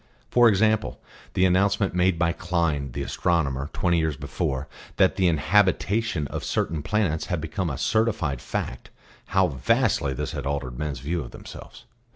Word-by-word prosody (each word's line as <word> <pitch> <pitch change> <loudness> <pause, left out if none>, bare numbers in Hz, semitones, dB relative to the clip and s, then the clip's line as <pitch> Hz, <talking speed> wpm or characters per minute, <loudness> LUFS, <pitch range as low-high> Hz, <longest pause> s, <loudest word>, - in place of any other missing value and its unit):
For 120 -1 +6
example, 110 +1 +1 0.4
the 95 - +4
announcement 100 +1 +2
made 90 -1 +2
by 85 0 +2
Klein, 85 -6 -1
the - - -3
astronomer, 75 -5 0
twenty 85 -2 +1
years 80 -3 -1
before, 65 +1 -3 0.3
that - - +4
the 95 - +2
inhabitation 95 - +2
of - - -5
certain 80 -2 -1
planets 90 -3 0
had 90 - -1
become 80 +3 -3
a 70 - -4
certified 100 - 0
fact - - -4 0.4
how 95 0 +3
vastly 85 - +1
this 75 +3 -3
had 70 -3 -4
altered 70 -4 -3
men's 75 -5 -3
views 80 +1 -2
of - - -9
themselves. - - -11
85 Hz, 160 wpm, -25 LUFS, 70-95 Hz, 0.4 s, For